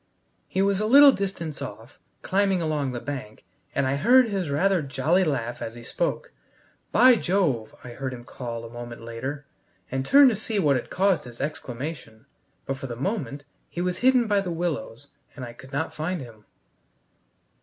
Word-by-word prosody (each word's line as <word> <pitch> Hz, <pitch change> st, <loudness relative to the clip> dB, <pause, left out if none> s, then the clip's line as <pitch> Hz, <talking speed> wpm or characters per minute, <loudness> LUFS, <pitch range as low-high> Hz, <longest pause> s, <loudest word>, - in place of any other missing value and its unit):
He 190 Hz, -, 0 dB
was 200 Hz, -1 st, +2 dB
a 215 Hz, -, 0 dB
little 280 Hz, +4 st, +9 dB
distance 190 Hz, -, -4 dB
off, 110 Hz, +5 st, -9 dB, 0.2 s
climbing 195 Hz, -1 st, +2 dB
along 150 Hz, -5 st, -1 dB
the 120 Hz, -, -4 dB
bank, 130 Hz, -6 st, -7 dB, 0.3 s
and 140 Hz, -, +2 dB
I 135 Hz, +1 st, 0 dB
heard 245 Hz, -, +5 dB
his 195 Hz, -7 st, -2 dB
rather 185 Hz, +5 st, +2 dB
jolly 140 Hz, +6 st, +1 dB
laugh 125 Hz, -7 st, -2 dB
as 115 Hz, -, -5 dB
he 120 Hz, -, -10 dB
spoke. -, -, -2 dB, 0.6 s
"By 250 Hz, +3 st, +7 dB
Jove!" 165 Hz, -, 0 dB
I 125 Hz, -, -8 dB
heard 130 Hz, +2 st, -4 dB
him 120 Hz, -2 st, -8 dB
call, 120 Hz, -2 st, -6 dB
a -, -, -8 dB
moment 120 Hz, -1 st, -8 dB
later, 130 Hz, +5 st, -5 dB, 0.5 s
and 135 Hz, 0 st, -1 dB
turned 275 Hz, -, +7 dB
to -, -, -1 dB
see 215 Hz, +1 st, -3 dB
what 150 Hz, -8 st, +3 dB
had 125 Hz, -, -3 dB
caused 185 Hz, -5 st, +1 dB
his 120 Hz, -1 st, -11 dB
exclamation; 130 Hz, -4 st, -6 dB, 0.4 s
but 135 Hz, -, -3 dB
for 135 Hz, -, -6 dB
the 120 Hz, -, -5 dB
moment 145 Hz, -, -3 dB, 0.3 s
he -, -, -7 dB
was 180 Hz, 0 st, -1 dB
hidden 255 Hz, -1 st, +4 dB
by 205 Hz, -2 st, +2 dB
the 190 Hz, -, -4 dB
willows, 160 Hz, -7 st, -3 dB, 0.3 s
and 130 Hz, -3 st, -6 dB
I 120 Hz, -, -9 dB
could 130 Hz, +2 st, -14 dB
not 145 Hz, +3 st, -2 dB
find 170 Hz, +4 st, -3 dB
him. 115 Hz, -6 st, -11 dB
145 Hz, 185 wpm, -25 LUFS, 125-190 Hz, 0.6 s, little